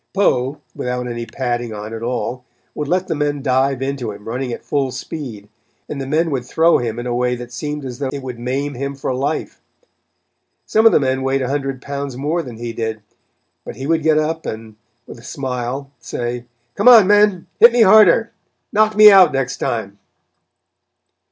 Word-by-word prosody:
Poe, 140 -8 +1 0.2
without 125 0 -3
any 120 -1 -5
padding 120 -3 -3
on 105 +2 -7
at 115 - -6
all, 125 +1 -3 0.3
would 150 - -4
let 180 +4 0
the - - -1
men 145 -2 -2
dive 135 0 +1
into 135 -4 -3
him 105 +1 -12
running 125 +2 -3
at - - -6
full 140 -2 0
speed, 125 -7 -7 0.4
and 140 -2 -5
the 135 - -5
men 160 +3 +1
would 130 -3 -2
throw 160 +7 +3
him 115 -2 -3
in 120 - -5
a 120 - -2
way 125 0 0
that 120 0 -9
seemed 150 +2 -5
as 125 -2 -7
though 140 -2 -2
it 140 -1 -6
would 125 -2 -7
maim 135 +4 -2
him 140 +2 -4
for 135 -1 -3
life. 140 +5 -3 1.0
Some 220 +1 +4
of - - +6
the - - +4
men 130 -1 0
weighed 135 0 0
a 125 - -3
hundred 135 -2 -3
pounds 140 -2 -5
more 155 +6 -1
than 125 -7 -9
he 120 0 -5
did, 110 -2 -4 0.6
but - - -8
he 135 - -6
would 165 +2 +1
get 155 0 +3
up 160 +1 -1
and, 110 0 -7 0.3
with - - -11
a - - -16
smile, 130 0 -4
say: 120 0 -5 0.3
"Come - - 0
on 230 -5 +9
men, 205 -2 +3
hit 235 - +9
me 235 -1 +4
harder; 215 +2 +6 0.4
knock 215 0 +3
me 210 0 +9
out 190 -4 +7
next 135 -1 -2
time." 100 -3 -3
135 Hz, 195 wpm, -19 LUFS, 120-155 Hz, 1.0 s, on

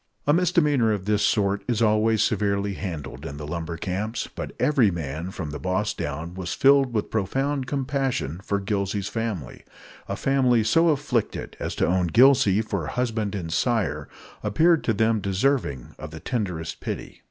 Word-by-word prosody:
A 145 - +4
misdemeanor 150 -9 +3
of 100 -3 -2
this 105 0 +1
sort 100 -1 +1
is 120 -3 0
always 110 0 +3
severely 100 -1 0
handled 80 -9 -6
in 70 - -6
the 75 - -6
lumber 85 +1 -4
camps. 105 +6 -3
But - - -5
every 135 -8 +4
man, 80 0 -4
from 80 -5 -5
the 75 - -6
boss 95 +3 -1
down, 75 +4 -5
was 90 -2 -4
filled 135 -1 +5
with 110 -3 -2
profound 135 +6 -1
compassion 135 - -1
for 100 -1 -1
Gillsey's 100 -1 -2
family. 110 - -4 0.4
A - - -2
family 130 -4 +2
so 165 +10 +4
afflicted 140 -6 -1
as - - -3
to - - +1
own 90 0 +1
Gillsey 115 - +5
for 100 -8 -3
husband 110 -5 -1
and 85 -4 -4
sire 110 +1 0 0.3
appeared 160 +10 +3
to 115 - +2
them 110 +1 +2
deserving 100 - 0
of 75 - -7
the 80 +1 -9
tenderest 90 - -3
pity. - - -6
105 Hz, 165 wpm, -25 LUFS, 90-125 Hz, 0.4 s, filled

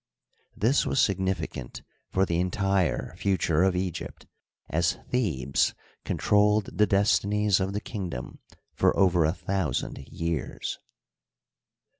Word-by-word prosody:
This 120 +8 +3
was 135 - 0
significant 95 - -1 0.3
for 95 +1 +2
the 85 -2 -1
entire 95 -1 0
future 90 -4 +1
of 95 -1 +3
Egypt, 90 -2 -4 0.4
as 85 +1 +1
Thebes 75 - +1 0.3
con - - -2
trolled 105 0 +2
the 105 - +5
destinies 100 0 +2
of 95 +1 -1
the 105 - -2
kingdom 90 - -6 0.3
for - - +2
over 90 -4 +4
a 80 - +3
thousand 95 -8 -2
years. 85 -4 -3
95 Hz, 115 wpm, -27 LUFS, 85-100 Hz, 0.4 s, the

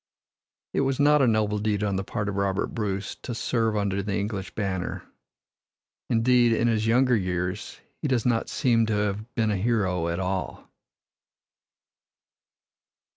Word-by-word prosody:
It - - +1
was 135 0 0
not 150 0 +5
a 130 - +4
noble 105 -2 +1
deed 105 -1 0
on 100 -2 0
the 95 - -1
part 105 +1 -3
of 105 - -2
Robert 100 -1 -1
Bruce 100 -3 -2
to 120 - -5
serve 115 -1 0
under 100 -1 0
the 100 0 -2
English 100 -2 -4
banner. 95 -4 -3 1.1
Indeed, 120 0 +4
in 115 +1 +2
his 110 -1 +1
younger 125 +2 +4
years 90 0 -2 0.2
he 150 - -1
does 125 -5 +1
not 115 -2 +1
seem 115 -5 +2
to 110 - 0
have 105 +3 -2
been 110 -2 +1
a 100 - 0
hero 95 -5 0
at 85 +1 -2
all. 95 0 -3
105 Hz, 155 wpm, -26 LUFS, 100-115 Hz, 1.1 s, not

